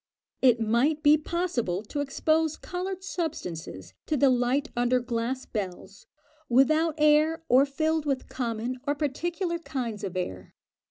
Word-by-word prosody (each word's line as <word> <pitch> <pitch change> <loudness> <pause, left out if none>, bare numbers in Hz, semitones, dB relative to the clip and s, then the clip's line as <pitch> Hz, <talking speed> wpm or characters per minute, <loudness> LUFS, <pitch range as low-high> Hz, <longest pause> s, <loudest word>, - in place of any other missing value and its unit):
It 245 -3 +5
might 240 +8 +1
be 295 0 +7
possible 300 - -2
to 285 +7 -5
expose 310 +3 +1
coloured 370 +1 -5
substances 170 - -5
to 305 - +1
the 275 0 +5
light 255 +4 +1
under 245 +1 +2
glass 245 +2 -3
bells, 195 -2 -6 0.4
without 310 +6 +3
air, 305 +2 +3
or 265 +3 +5
filled 315 +2 0
with 270 -2 -1
common 240 0 -3
or 290 - +1
particular 340 +5 -2
kinds 250 -9 -4
of 190 -2 -4
air. 95 - -5
270 Hz, 140 wpm, -27 LUFS, 235-315 Hz, 0.4 s, be